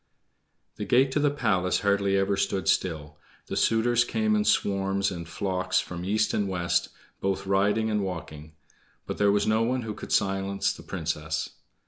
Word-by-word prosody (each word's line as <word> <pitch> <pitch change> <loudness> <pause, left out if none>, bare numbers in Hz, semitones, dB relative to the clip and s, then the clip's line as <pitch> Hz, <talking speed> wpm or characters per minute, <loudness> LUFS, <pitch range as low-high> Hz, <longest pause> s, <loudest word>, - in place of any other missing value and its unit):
The - - -4
gate 130 +2 +3
to 150 - +1
the 145 0 +3
palace 95 -10 0
hardly 100 -1 +2
ever 95 +1 +1
stood 95 0 -1
still. 75 -4 -1 0.3
The - - -5
suitors 120 +1 +3
came 215 - 0
in 210 0 +1
swarms 100 - +1
and 85 -2 -7
flocks 95 +1 0
from 90 -1 -5
east 110 +2 +1
and 100 -2 0
west, 90 -2 0 0.3
both 95 0 -1
riding 105 +3 +2
and 105 -1 0
walking. 80 -4 -6 0.5
But - - -5
there 100 -1 +4
was 100 0 +2
no 110 +1 +2
one 125 +2 0
who 110 -1 -4
could - - -9
silence 95 0 +1
the - - -12
Princess. 80 -2 -3
100 Hz, 170 wpm, -27 LUFS, 90-110 Hz, 0.5 s, there